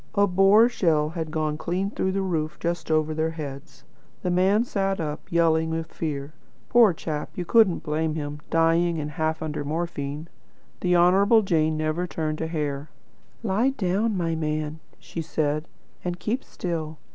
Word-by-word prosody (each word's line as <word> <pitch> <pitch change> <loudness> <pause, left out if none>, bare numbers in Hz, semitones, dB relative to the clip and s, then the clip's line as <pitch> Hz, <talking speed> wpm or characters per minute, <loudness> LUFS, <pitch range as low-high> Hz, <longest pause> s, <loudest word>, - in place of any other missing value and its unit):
A 200 0 +5
Boer 195 +4 +6
shell 160 -10 +1
had 160 -1 -4
gone 155 -1 -1
clean 185 +5 -1
through 190 - -1
the 195 0 0
roof 160 -4 -2
just 170 -1 -3
over 155 0 +2
their 160 +1 0
heads. 150 -1 -8 0.4
The 180 - 0
man 190 +5 +3
sat 195 -4 -1
up, 150 -2 -5
yelling 160 -1 +3
with 160 0 -4
fear. 145 -2 -4 0.4
Poor 235 -4 +6
chap, 155 -2 -4
you 180 - -2
couldn't 215 -3 +4
blame 155 0 -1
him; 145 -1 -4
dying, 165 +1 +3
and 150 -1 -3
half 160 0 -1
under 150 -2 -3
morphine. 150 -1 -3 0.5
The 180 -1 +2
Honourable 195 +6 +5
Jane 160 -4 +1
never 155 +3 -1
turned 155 -2 -3
a 160 - -1
hair. 150 -3 -3 0.5
'Lie 220 +5 +2
down, 200 +3 +1
my 165 -2 0
man,' 155 0 -2 0.2
she 165 - -6
said, 155 0 -1 0.4
'and 180 0 -3
keep 240 +5 -2
still.' 160 -3 -4
165 Hz, 165 wpm, -25 LUFS, 155-180 Hz, 0.5 s, Boer